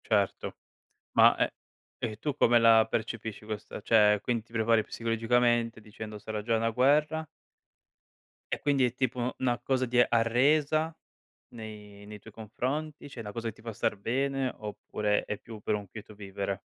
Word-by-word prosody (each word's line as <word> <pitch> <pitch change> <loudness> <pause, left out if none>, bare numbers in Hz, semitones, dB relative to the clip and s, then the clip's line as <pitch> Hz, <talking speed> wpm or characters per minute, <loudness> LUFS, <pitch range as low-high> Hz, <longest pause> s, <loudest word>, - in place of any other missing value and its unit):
Certo. 100 -3 0 0.6
Ma - - +6
e - - +1 0.5
e 110 -3 -4
tu 145 +3 -2
come 120 -4 +5
la 115 -1 +6
percepisci 110 -1 -4
questa 110 0 -6
cioè 105 -1 +4
quin 120 -3 -1
ti 115 - -26
prepari 115 -1 +3
psicologicamente 115 0 +1
dicendo 105 0 -8
sarà 105 0 -5
già 115 +2 0
una 115 +1 +1
guerra? 150 +6 +2 1.3
E - - -1
quindi 140 -2 +2
è 125 -2 +2
tipo 125 -1 -1
'na 125 -2 0
cosa 130 -1 0
di 125 0 -2
arresa 145 +7 +2 0.6
nei 105 -3 -10
nei 105 0 -9
tuoi 110 +2 -14
confronti? 135 +8 -4
Cioè 125 - -8
una 105 -2 -6
cosa 115 +2 -4
che 110 - -3
ti - - -18
fa 115 0 -6
star 110 0 -1
bene 135 +4 -1
oppure 105 0 -2
è 105 - -4
più 110 -2 -11
per 105 - 0
un 105 -1 -6
quieto 105 +2 -10
vivere? 100 -1 -4
115 Hz, 165 wpm, -29 LUFS, 105-125 Hz, 1.3 s, Ma